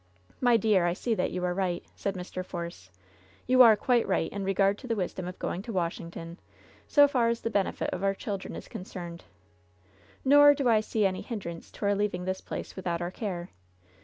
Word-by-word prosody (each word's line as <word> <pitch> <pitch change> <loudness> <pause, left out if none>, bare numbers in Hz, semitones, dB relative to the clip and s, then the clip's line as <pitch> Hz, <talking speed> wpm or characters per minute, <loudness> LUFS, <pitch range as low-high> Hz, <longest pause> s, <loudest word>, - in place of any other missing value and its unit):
'* - - -29
"My 245 -2 +5
dear, 210 -6 +3
I 170 - +1
see 230 +5 -1
that 185 - 0
you 180 0 -3
are 180 - 0
right," 180 -2 -2
said 200 -1 -3
Mr. 185 0 -5
Force. 170 - -7 0.6
"You 255 +1 +5
are 230 -3 +9
quite 240 +3 +2
right 180 -4 0
in 200 0 -4
regard 195 +1 +2
to 255 - -9
the 230 - 0
wisdom 185 -2 -3
of 180 - -7
going 180 - -3
to 230 - -7
Washington, 170 -2 -4 0.5
so 290 -1 +6
far 250 -5 +2
as 235 0 -1
the 230 - -2
benefit 200 -3 0
of 185 - -4
our 195 0 +2
children 195 -1 -5
is - - -8
concerned; 175 -2 -8 1.0
nor 290 +1 +8
do 275 -2 0
I 225 -2 +5
see 215 0 0
any 185 -1 0
hindrance 175 -8 -6
to - - -5
our 200 - +3
leaving 200 -3 -1
this 190 0 -2
place - - -6
without 175 -3 -2
our 175 +1 -3
care. 185 -4 -5
195 Hz, 210 wpm, -28 LUFS, 180-225 Hz, 1.0 s, are